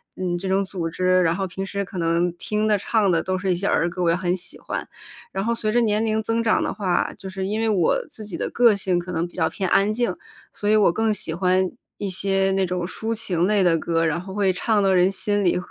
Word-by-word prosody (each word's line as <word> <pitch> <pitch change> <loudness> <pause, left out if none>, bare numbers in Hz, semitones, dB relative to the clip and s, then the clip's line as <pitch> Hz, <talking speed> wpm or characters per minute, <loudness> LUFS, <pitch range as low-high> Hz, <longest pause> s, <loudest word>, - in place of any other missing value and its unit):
嗯， 180 -1 -2
这 190 - -5
种 190 +1 +2
组 185 -4 -4
织， 185 +2 +2
然 165 -1 +2
后 190 +1 -2
平 190 +2 -5
时 200 +1 -3
可 195 -1 -9
能 170 +1 +1
听 210 +4 -1
的 210 - +3
唱 205 +1 +1
的 165 -2 +2
都 185 - -1
是 190 0 0
一 180 - +2
些 190 - -4
儿 170 -3 +2
歌， 180 +1 -4
我 170 - +3
也 - - +2
很 180 0 0
喜 180 0 -6
欢。 - - -5 0.4
然 195 0 -2
后 235 +1 0
随 215 -1 -1
着 240 +2 +3
年 215 0 +1
龄 220 0 0
增 225 +1 -1
长 220 - +2
的 - - -1
话， 190 -4 0
就 190 -1 -8
是 190 0 -3
因 210 +2 -2
为 225 - +1
我 190 -7 +2
自 215 - -9
己 200 -4 -6
的 - - -2
个 235 -3 +5
性 185 -3 0
可 180 +1 -6
能 170 0 -1
比 175 - -19
较 160 - +1
偏 190 - -3
安 200 +2 +4
静， 215 -4 -1 0.4
所 205 - -2
以 215 - +5
我 200 -5 +4
更 220 +2 +1
喜 190 -5 -3
欢 185 +1 +1 0.3
一 200 - -3
些 195 +1 +1
那 190 0 +2
种 180 -1 -2
抒 220 +5 -3
情 180 -6 0
类 205 -1 +3
的 170 -2 +4
歌， 165 0 0
然 160 +1 0
后 190 +2 -8
会 200 -1 +2
唱 210 +3 +1
到 195 - +3
人 180 0 +4
心 205 +1 -1
里， 175 - +3
190 Hz, 290 characters per minute, -23 LUFS, 175-210 Hz, 0.4 s, 个